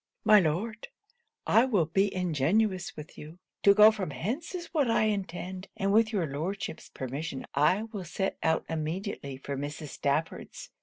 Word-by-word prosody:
'My 215 -1 +8
Lord, 200 +7 -1 0.6
I 230 - +5
will 205 -11 +2
be 195 +5 +1
ingenuous 185 +3 0
with 150 0 -10
you. 155 +3 -10 0.2
To 200 0 +6
go 215 +1 +9
from 200 -6 -4
hence 225 - -4
is 345 -2 -7
what 290 -7 +2
I 225 - +3
intend, 190 -2 -3
and 195 +1 +1
with 220 0 +4
your 195 -6 0
Lordship's 160 +6 -4
permission 135 +2 -5
I 155 +9 +3
will 215 -5 -7
set 190 +3 -3
out 160 0 +1
immediately 160 -3 -4
for 140 +1 -5
Mrs. 145 +2 -5
Stafford's. 160 - -3
185 Hz, 160 wpm, -29 LUFS, 155-215 Hz, 0.6 s, go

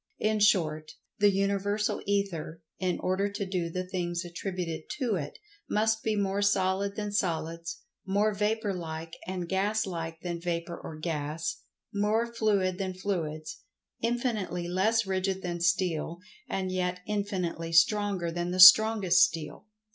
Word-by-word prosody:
In 215 0 +1
short, 160 -7 +2 0.3
The 205 0 +6
Universal 200 +1 0
Ether, 180 -5 -2 0.2
in 185 -2 0
order 190 +2 0
to 200 0 -4
do 180 -3 -2
the 185 +2 -3
things 175 -2 -3
attributed 175 -2 -5
to 250 -6 0
it, 150 -6 -4 0.3
must 220 +1 +2
be 220 -1 0
more 200 0 0
solid 200 0 +1
than 210 -1 -3
Solids; 165 -4 -2 0.2
more 205 +3 +1
Vapor 210 0 0
like 165 -2 -6
and 180 -2 -3
Gas 200 +4 0
like 165 -3 -5
than 170 -1 -4
Vapor 170 0 -3
or 160 - -8
Gas; 155 0 -3 0.4
more 210 +3 +1
fluid 205 -5 0
than 190 -1 -3
Fluids; 160 -5 -3 0.4
infinitely 225 -8 -1
less 210 +5 +2
rigid 190 0 -1
than 175 -1 -3
steel, 175 -2 0 0.3
and 185 -1 -2
yet 180 0 -1
infinitely 185 -5 -2
stronger 185 +1 +3
than 175 +1 -2
the 180 +1 -2
strongest 195 -1 +8
steel. 165 +2 -2
185 Hz, 140 wpm, -29 LUFS, 170-205 Hz, 0.4 s, strongest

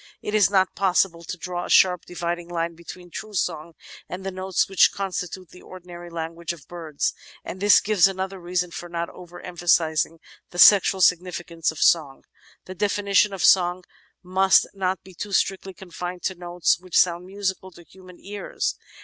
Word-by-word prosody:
It 210 - -4
is 210 -3 +4
not 190 -2 +2
possible 180 -3 +1
to 180 - -6
draw 180 0 -5
a - - -9
sharp 180 -2 +4
dividing 175 0 -4
line 170 -1 -2
between 175 +1 -12
true 215 +3 -8
song 165 -2 -2 0.4
and 185 +1 -7
the 195 - -3
notes 185 0 -1
which 195 - +4
constitute 185 -2 -5
the 180 - -15
ordinary 175 -1 -11
language 165 0 -5
of 155 -6 -15
birds, 165 -4 -3 0.3
and 185 - -7
this 205 +1 +6
gives 205 -3 +4
another 190 0 -4
reason 180 0 -2
for 175 +1 -8
not 170 0 -4
over 175 -1 -12
emphasising 165 -2 +1 0.3
the 175 - -11
sexual 195 0 +6
significance 175 -2 +1
of 160 - -13
song. 145 -4 +2 0.4
The 185 - -8
definition 200 +1 +2
of 195 -2 -4
song 180 -1 +4 0.4
must 190 +1 +4
not 190 -2 -2
be 190 - -15
too 200 +3 -7
strictly 190 0 0
confined 180 -1 -7
to 190 - -1
notes 175 -1 0
which 185 -1 -3
sound 175 0 +2
musical 190 -1 -3
to 175 -1 -16
human 185 0 -16
ears. 205 0 -4
180 Hz, 175 wpm, -24 LUFS, 170-190 Hz, 0.4 s, this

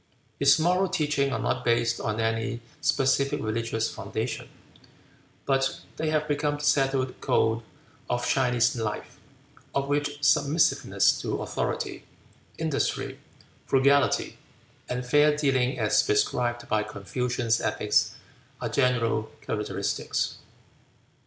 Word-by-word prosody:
His 140 +1 +6
moral 180 +4 +2
teachings 145 -5 0
are - - -1
not - - -1
based 115 0 +1
on 110 0 -2
any 115 +1 -1 0.2
specific 135 +1 +2
religious 115 +1 -1
foundation, - - -4 1.0
but 135 -1 0 0.2
they 155 0 -1
have 155 -1 0
become 145 0 0
the 145 - -8
settled 135 -3 +1
code 115 +1 +2 0.5
of 120 0 -1
Chinese 125 -2 +2
life, 110 -3 -4 0.6
of 140 0 0
which 145 0 -1
submissiveness 150 +2 +3
to - - -2
authority, - - -3 0.5
industry, - - -2 0.5
frugality, 140 +1 +3 0.5
and 125 0 -3
fair 150 +3 +4
dealing 135 -4 +1
as 110 -3 +3
prescribed 120 +3 0
by 110 0 +1
Confucian 115 +3 -3
ethics - - +1 0.4
are - - -3
general 115 -4 +1
characteristics. - - -2
130 Hz, 110 wpm, -27 LUFS, 115-145 Hz, 1.0 s, His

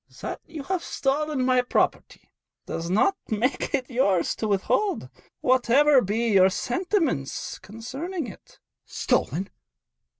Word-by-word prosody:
'That - - -5
you 315 -3 -7
have 370 +2 -2
stolen 285 -1 -1
my 255 -1 +4
property 245 - -1 0.3
does 165 +1 -4
not 225 - +3
make 230 +5 0
it 255 -2 -3
yours 200 -9 +1
to 220 - -2
withhold, 215 - 0 0.3
whatever 260 +2 +4
may - - -3
be 225 +4 0
your 190 -1 +6
sentiments 255 - -1
concerning 270 - -5
it.' 205 - -13 0.3
'"Stolen!" 170 +9 -1
255 Hz, 125 wpm, -25 LUFS, 205-295 Hz, 0.3 s, your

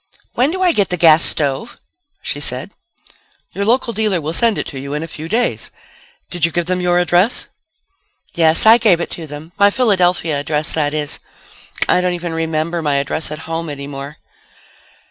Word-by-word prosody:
"When 255 +4 +2
do 375 +3 -2
I 360 - +5
get 205 -10 +1
the 180 - 0
gas 165 -1 +6
stove?" 145 - -2 0.5
she 145 - -3
said. 130 +5 +1 0.8
"Your 200 - -3
local 235 +1 +1
dealer 215 -5 0
will 155 +1 -4
send 225 +3 +2
it - - -2
to 135 - -7
you 140 +2 -5
in 150 - -3
a - - -6
few 160 0 -8
days. 240 +3 -1 0.6
Did 175 -3 -5
you 170 - +4
give 175 0 -1
them 180 +1 -1
your 175 0 +2
address?" 180 +6 +2 0.8
"Yes, 160 +2 +3
I 225 +2 +8
gave 190 -8 +3
it 170 - -4
to 165 -2 -7
them. 150 +3 -9
My 200 0 +6
Philadelphia 180 - +1
address, 150 +1 -1
that 150 -1 0
is. 150 -1 -2 0.7
I 180 - +3
don't 180 0 0
even 175 -1 -5
remember 165 +1 -2
my 145 -2 0
address 140 +3 -1
at 155 +1 -8
home 165 0 -4
any 140 -1 -6
more." 140 +1 -8
165 Hz, 190 wpm, -17 LUFS, 150-190 Hz, 0.8 s, I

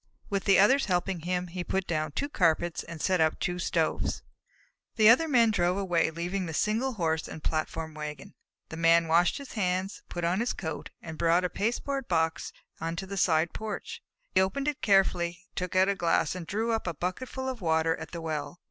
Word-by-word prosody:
With 195 -1 -1
the 195 -2 +5
others 260 +8 +5
helping 180 -1 0
him, 180 +2 -2
he 180 +1 -4
put 190 +1 -1
down 155 -3 -2
two 285 - -1
carpets 170 - +1
and 170 -1 -9
set 185 +1 +1
up 155 -1 +2
two 180 -1 -2
stoves. - - -1 0.7
The 215 -1 +6
other 265 +8 +6
Men 235 -6 +4
drove 180 -2 +1
away, 175 -5 +1
leaving 175 +3 -3
the 160 - -5
single 230 - 0
Horse 160 -6 -1
and - - -8
the - - -4
platform 160 0 -2
wagon. 150 -2 -7 0.4
The 165 - -7
Man 165 0 +4
washed 170 +2 +3
his 280 -2 -9
hands, 185 -2 -1
put 175 - -5
on 175 +3 +1
his 240 +2 0
coat, 160 -4 -5
and 160 -1 -8
brought 170 +2 +3
a - - 0
pasteboard 250 +6 -2
box 160 -2 0 0.3
out 165 - -2
onto 165 +3 -3
the 200 +1 -6
side 165 -3 +2
porch. 220 - -5 0.3
He - - +5
opened 275 +10 -1
it 295 -2 -1
carefully, 180 -3 +2
took 180 -1 -4
out 185 +1 +5
a 200 - +2
glass, 170 -4 +1
and 180 -3 -7
drew 220 +5 -1
up 225 -4 -1
a 170 - -2
bucketful 255 - -4
of 255 -4 -4
water 160 -1 +2
at 160 -1 -8
the 170 - -6
well. 160 +1 -4
180 Hz, 210 wpm, -28 LUFS, 165-205 Hz, 0.7 s, The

